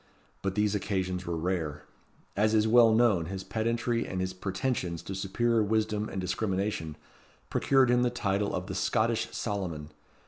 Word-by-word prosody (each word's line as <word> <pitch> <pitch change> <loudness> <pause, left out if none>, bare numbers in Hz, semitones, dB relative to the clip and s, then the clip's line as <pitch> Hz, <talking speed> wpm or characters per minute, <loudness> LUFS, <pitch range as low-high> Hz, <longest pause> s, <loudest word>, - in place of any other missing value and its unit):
But 95 0 -2
these 105 -1 +2
occasions 95 -3 -2
were 85 -1 -1
rare. 80 -4 -2 0.5
As 110 +2 +2
is 110 0 +3
well 115 0 +6
known, 110 -7 +3
his 95 +1 -5
pedantry 115 +3 -1
and 95 - -3
his 95 0 -2
pretensions 95 -2 -2
to 95 - -6
superior 110 +5 +1
wisdom 110 0 0
and 95 - -4
discrimination, 95 -3 -2 0.6
procured 135 -3 +3
him 125 0 +4
the 125 - +3
title 100 -4 -1
of 90 - -3
the 95 - -5
"Scottish 110 +4 +1
Solomon." 90 -8 -4
100 Hz, 160 wpm, -29 LUFS, 95-110 Hz, 0.6 s, well